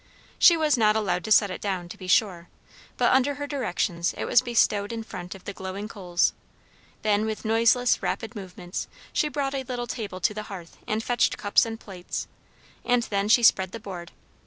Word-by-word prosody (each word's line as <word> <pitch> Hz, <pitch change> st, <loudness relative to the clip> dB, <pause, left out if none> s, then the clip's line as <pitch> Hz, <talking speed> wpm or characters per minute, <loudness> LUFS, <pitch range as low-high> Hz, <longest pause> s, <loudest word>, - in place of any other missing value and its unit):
She 340 Hz, -, +7 dB
was 300 Hz, -5 st, +2 dB
not 215 Hz, -1 st, +4 dB
allowed 185 Hz, -5 st, 0 dB
to 220 Hz, -, -5 dB
set 205 Hz, -2 st, +5 dB
it -, -, -6 dB
down, 190 Hz, -4 st, -2 dB
to -, -, -8 dB
be 190 Hz, -3 st, -10 dB
sure, 180 Hz, -3 st, +2 dB, 0.5 s
but -, -, +3 dB
under 270 Hz, +2 st, +3 dB
her 290 Hz, 0 st, -4 dB
directions 185 Hz, -, -1 dB
it -, -, -2 dB
was 240 Hz, -, +5 dB
bestowed 220 Hz, -4 st, +1 dB
in 225 Hz, -1 st, -4 dB
front 180 Hz, -4 st, -8 dB
of 190 Hz, -, -13 dB
the 200 Hz, -, -6 dB
glowing 190 Hz, +2 st, -6 dB
coals. 180 Hz, -6 st, 0 dB, 0.7 s
Then, 210 Hz, -1 st, +2 dB
with 220 Hz, 0 st, -4 dB
noiseless, 230 Hz, +3 st, +3 dB
rapid 225 Hz, +1 st, -3 dB
movements, 180 Hz, -3 st, -6 dB, 0.3 s
she 300 Hz, -, +1 dB
brought 280 Hz, -2 st, -2 dB
a 270 Hz, -, -1 dB
little 245 Hz, -2 st, -4 dB
table 210 Hz, -6 st, -5 dB
to 210 Hz, -, +2 dB
the 215 Hz, -, -4 dB
hearth 180 Hz, -4 st, -9 dB
and 215 Hz, +1 st, -1 dB
fetched 240 Hz, 0 st, +1 dB
cups 205 Hz, +2 st, +3 dB
and 225 Hz, 0 st, -6 dB
plates. 185 Hz, -5 st, -6 dB, 0.6 s
And 245 Hz, -1 st, +2 dB
then 200 Hz, -1 st, -1 dB
she 240 Hz, +2 st, +5 dB
spread 190 Hz, -4 st, +4 dB
the 230 Hz, -, -5 dB
board. 180 Hz, -5 st, -8 dB
215 Hz, 200 wpm, -26 LUFS, 185-240 Hz, 0.7 s, She